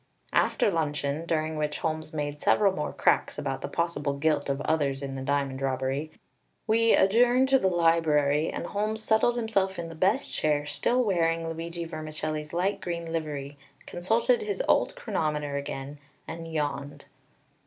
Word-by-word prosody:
After - - +3
luncheon, 150 -1 -1
during 155 -1 -1
which 150 0 -1
Holmes 155 -1 -3
made 145 -1 -4
several 200 -2 +4
more 150 -5 -3
cracks - - +1
about - - -3
the - - -3
possible 170 -4 -1
guilt 150 -1 +1
of 135 0 0
others 140 -3 0
in 135 -1 -4
the 135 - -5
diamond 135 -1 -1
robbery, 135 +3 -1 0.6
we 230 +1 +4
adjourned 245 +6 +4
to 270 0 +5
the 190 - +2
library, 160 -4 +3
and - - -4
Holmes 215 +2 -2
settled 220 +2 +3
himself 200 -5 0
in 170 -1 -4
the - - -8
best 190 - +1
chair, 150 -1 +1
still 250 +11 +1
wearing 165 -5 +1
Luigi 165 +1 -5
Vermicelli's 155 -1 -5
light 185 +4 0
green 170 -2 -4
livery, 145 -3 -4 0.3
consulted 225 - +1
his 430 +3 -2
old - - +3
chronometer 150 - -2
again, 140 0 -5 0.3
and 165 +1 -7
yawned. 145 -2 -3
160 Hz, 155 wpm, -27 LUFS, 145-190 Hz, 0.6 s, to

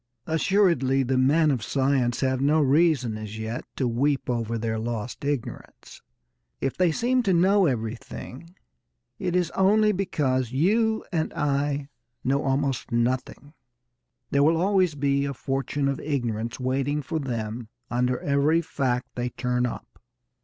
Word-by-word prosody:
Assuredly 160 -6 +2
the 130 +1 0
men 150 +5 +4
of 130 -5 -1
science 130 0 0
have 130 -1 +1
no 150 +3 +3
reason 140 -6 +2
as 110 0 -7
yet 110 +2 -4
to 130 - 0
weep 135 +3 0
over 115 -1 -2
their 110 0 -2
lost 115 +2 -4
ignorance. 140 -4 -5 0.6
If 135 - -2
they 180 -2 +3
seem 250 +9 +1
to 200 -6 +1
know 190 +2 +4
everything, 125 +6 -5 0.6
it 180 - -1
is 180 -2 +1
only 210 +3 +3
because 140 - -1
you 220 - +1
and 160 -3 -1
I 145 0 0 0.4
know 140 +2 +1
almost 135 -1 -1
nothing. 125 +4 -1 0.8
There 140 - +3
will 160 +3 +4
always 185 -2 +2
be 140 0 +1
a 140 -1 -3
fortune 135 +2 -2
of 140 -1 -1
ignorance 120 -6 -2
waiting 135 +3 -1
for 160 +4 -3
them 115 -4 -4 0.2
under 125 +1 +1
every 145 +4 +2
fact 125 -4 -1
they 125 0 -2
turn 125 0 -1
up. 120 - -9
140 Hz, 145 wpm, -25 LUFS, 125-160 Hz, 0.8 s, men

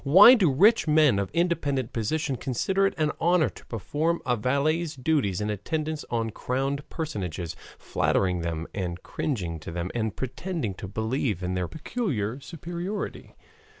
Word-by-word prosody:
Why 190 - +9
do 190 - +4
rich 200 - +5
men 150 -8 +5
of 100 - -1
independent 145 -8 0
position 135 +5 -1
consider 190 +12 +1
it - - -4
an 155 -1 +2
honor 175 -1 +4
to - - -14
perform 150 - -1
a 125 - +2
valet's 145 +8 0
duties 125 - +1
in 105 0 -1
attendance 155 - -3
on 115 -2 -1
crowned 135 +5 -2
personages, 90 - -4 0.2
flattering 90 -2 +1
them 85 -1 -3
and 90 -2 -4
cringing 90 - -3
to 80 - -8
them 85 +2 -3
and 110 -3 -1
pretending 130 - -3
to 95 - -7
believe 110 -1 -1
in 90 +1 -1
their 90 -1 -1
peculiar 140 - -2
superiority? 175 +6 -5
135 Hz, 150 wpm, -27 LUFS, 100-160 Hz, 0.2 s, Why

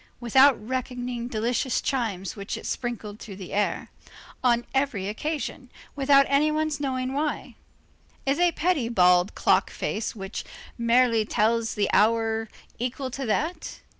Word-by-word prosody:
Without 260 +3 +5
reckoning 250 -1 -3
delicious 240 +2 0
chimes 205 -9 -2
which 200 -1 -5
it - - -9
sprinkled 225 -4 -4
through 200 - -9
the 185 -2 -9
air, 205 +1 -1 0.5
on 240 -1 +3
every 265 -8 0
occasion, 275 +3 -4 0.3
without 275 0 +5
any 280 +3 +3
one's 310 -1 -1
knowing 260 -2 -2
why. 295 +2 -2 0.7
Is 275 +3 +1
a 350 -1 +4
petty 305 -9 0
bald 180 -3 +4
clock - - +3
face 220 +2 -3
which 195 0 -6 0.3
merely 235 -1 +3
tells 225 +2 +1
the 205 -2 +1
hour 225 0 +2 0.3
equal 255 +2 -3
to 270 0 -4
that? 315 +11 -2
240 Hz, 135 wpm, -26 LUFS, 220-275 Hz, 0.7 s, Without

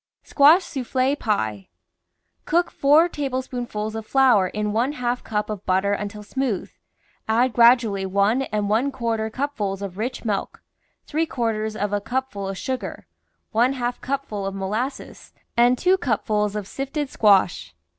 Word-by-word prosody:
SQUASH 310 +6 +5
SOUFFLE 265 -2 -1
PIE 110 - -2 0.8
Cook 345 +2 +1
four 295 +5 +4
tablespoonfuls 255 -7 -4
of 220 0 -5
flour 240 -5 +4
in 210 +2 -3
one 245 +6 +1
half 245 -2 -2
cup 210 -1 -2
of 210 -2 -5
butter 190 +2 +2
until 210 +1 -4
smooth, 245 -2 -2 0.6
add 235 +3 +2
gradually 235 -5 +4
one 200 +6 +2
and 210 -5 -2
one 230 +7 +1
quarter 230 -4 -2
cupfuls 215 -7 -3
of 195 0 -6
rich 245 +2 -4
milk, 205 -3 -3 0.4
three 320 +2 -1
quarters 220 -5 -2
of 205 -1 -2
a 205 - 0
cupful 225 -3 -3
of 195 0 -4
sugar, 260 +3 -4 0.5
one 240 +4 +3
half 245 -2 -3
cupful 250 -7 -3
of 195 - -4
molasses, 215 +8 -4 0.2
and 245 +1 +4
two 370 +5 +3
cupfuls 210 - 0
of 205 -2 -4
sifted 275 +4 -3
squash. 200 -7 +2
225 Hz, 145 wpm, -23 LUFS, 205-265 Hz, 0.8 s, SQUASH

